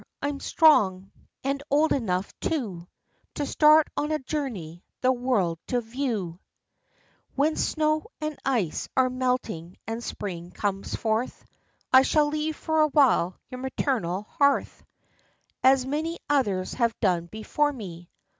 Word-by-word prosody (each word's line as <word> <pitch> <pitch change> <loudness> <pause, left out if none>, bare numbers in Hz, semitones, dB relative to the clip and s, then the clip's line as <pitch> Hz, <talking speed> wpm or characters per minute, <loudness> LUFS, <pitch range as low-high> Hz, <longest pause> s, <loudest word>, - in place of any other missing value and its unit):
I'm 285 0 -3
strong, 195 - +3 0.3
and 275 +1 -1
old 300 +3 +3
enough, 195 -7 -1
too, 205 - -3 0.5
To 290 - -1
start 305 +2 +5
on 300 +1 -1
a 310 - +2
journey, 235 - -5 0.2
the 255 - +4
world 240 -10 0
to 250 - +1
view; 225 -8 -3 1.0
When 300 +3 +2
snow 310 +3 0
and 305 0 -3
ice 230 - -1
are 255 -1 +4
melting 250 -9 -2
and 225 +1 -4
spring 175 -6 -5
comes 200 -1 -2
forth, 225 +2 -2 0.5
I 260 - +9
shall 295 +2 +2
leave 305 +1 -2
for 315 0 0
a 305 - +5
while 260 - +3
your 255 - -7
maternal 245 - -1
hearth, 280 +6 +1 0.8
As 260 0 +5
many 315 +5 -2
others 205 -10 +1
have 235 -2 0
done 175 -5 +1
before 220 - 0
me." 175 -9 -9
255 Hz, 135 wpm, -26 LUFS, 195-290 Hz, 1.0 s, I